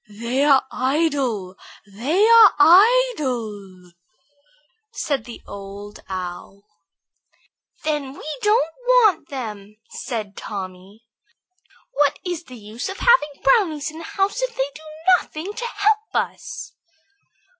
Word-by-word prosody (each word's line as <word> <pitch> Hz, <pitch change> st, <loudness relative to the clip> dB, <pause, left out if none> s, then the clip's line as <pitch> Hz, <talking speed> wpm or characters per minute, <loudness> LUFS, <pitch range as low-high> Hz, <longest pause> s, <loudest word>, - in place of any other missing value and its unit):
"They 235 Hz, +6 st, -2 dB
are 275 Hz, -2 st, +4 dB
idle, 260 Hz, -, -1 dB, 0.3 s
they 260 Hz, -, 0 dB
are 455 Hz, -5 st, +8 dB
idle," 265 Hz, -, +3 dB, 1.0 s
said 275 Hz, -, -2 dB
the 240 Hz, -2 st, -11 dB
Old 200 Hz, +1 st, -9 dB
Owl. 185 Hz, +1 st, -7 dB, 1.2 s
"Then 295 Hz, -3 st, -2 dB
we -, -, -12 dB, 0.2 s
don't 415 Hz, -7 st, +2 dB
want 440 Hz, -10 st, +4 dB
them," 215 Hz, -6 st, -7 dB
said 215 Hz, -5 st, -5 dB
Tommy. 195 Hz, +1 st, -8 dB, 0.9 s
"What 285 Hz, 0 st, +2 dB
is 350 Hz, -2 st, -4 dB
the 255 Hz, -4 st, -11 dB
use 220 Hz, -, -6 dB
of 385 Hz, -, -6 dB
having 300 Hz, -, +2 dB
brownies 310 Hz, -2 st, +2 dB
in 315 Hz, -, -10 dB
the 330 Hz, -, -8 dB
house 395 Hz, +8 st, -1 dB
if -, -, -3 dB
they 270 Hz, +2 st, -1 dB
do -, -, -12 dB, 0.4 s
nothing 330 Hz, +8 st, -7 dB
to 465 Hz, +3 st, -5 dB
help 430 Hz, -1 st, 0 dB
us?" 355 Hz, +3 st, -4 dB
280 Hz, 115 wpm, -21 LUFS, -, 1.2 s, are